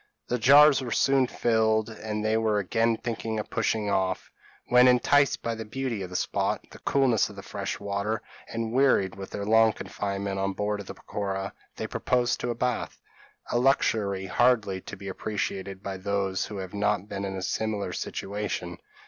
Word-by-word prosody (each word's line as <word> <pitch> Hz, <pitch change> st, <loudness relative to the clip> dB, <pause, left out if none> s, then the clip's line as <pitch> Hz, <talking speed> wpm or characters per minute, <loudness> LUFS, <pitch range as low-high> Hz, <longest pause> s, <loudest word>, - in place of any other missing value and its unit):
The 125 Hz, -, 0 dB
jars 140 Hz, +4 st, +7 dB
were 125 Hz, -, -4 dB
soon 135 Hz, +2 st, +3 dB
filled, 110 Hz, -2 st, +2 dB
and 110 Hz, -1 st, -4 dB
they 110 Hz, 0 st, +2 dB
were 110 Hz, -2 st, +2 dB
again 115 Hz, +3 st, +1 dB
thinking 115 Hz, -2 st, -3 dB
of 105 Hz, -, -6 dB
pushing 110 Hz, -2 st, 0 dB
off; 95 Hz, -2 st, -1 dB, 0.3 s
when, 125 Hz, +1 st, +6 dB
enticed 135 Hz, +3 st, +4 dB
by 115 Hz, -, -1 dB
the 110 Hz, 0 st, -5 dB
beauty 120 Hz, -1 st, -3 dB
of 95 Hz, -, -5 dB
the 90 Hz, -, -9 dB
spot, -, -, -1 dB
the -, -, -12 dB
coolness 130 Hz, -6 st, +2 dB
of -, -, -11 dB
the -, -, -9 dB
fresh -, -, -4 dB
water, 100 Hz, +2 st, -2 dB, 0.2 s
and 115 Hz, 0 st, -3 dB
wearied 130 Hz, -8 st, +3 dB
with 95 Hz, -1 st, -8 dB
their 100 Hz, -, -4 dB
long 110 Hz, +1 st, +5 dB
confinement 100 Hz, -1 st, -4 dB
on 95 Hz, 0 st, 0 dB
board 105 Hz, +1 st, -2 dB
of 100 Hz, -, -8 dB
the -, -, -7 dB
peroqua, 95 Hz, -1 st, -4 dB, 0.2 s
they -, -, -4 dB
proposed 125 Hz, -1 st, 0 dB
to 120 Hz, -, -1 dB
bathe 125 Hz, 0 st, -1 dB, 0.6 s
a 120 Hz, -, +2 dB
luxury 105 Hz, -7 st, +2 dB
hardly 105 Hz, -2 st, +2 dB
to -, -, -9 dB
be 100 Hz, 0 st, -9 dB
appreciated 95 Hz, -1 st, -4 dB
by 95 Hz, -2 st, -4 dB
those 95 Hz, 0 st, -1 dB
who 105 Hz, -, -7 dB
have 95 Hz, 0 st, -6 dB
not 105 Hz, -1 st, 0 dB
been 100 Hz, -1 st, -4 dB
in 95 Hz, -1 st, -3 dB
a 95 Hz, -, -4 dB
similar 110 Hz, 0 st, -2 dB
situation. 100 Hz, -3 st, -4 dB
105 Hz, 180 wpm, -27 LUFS, 100-115 Hz, 0.6 s, jars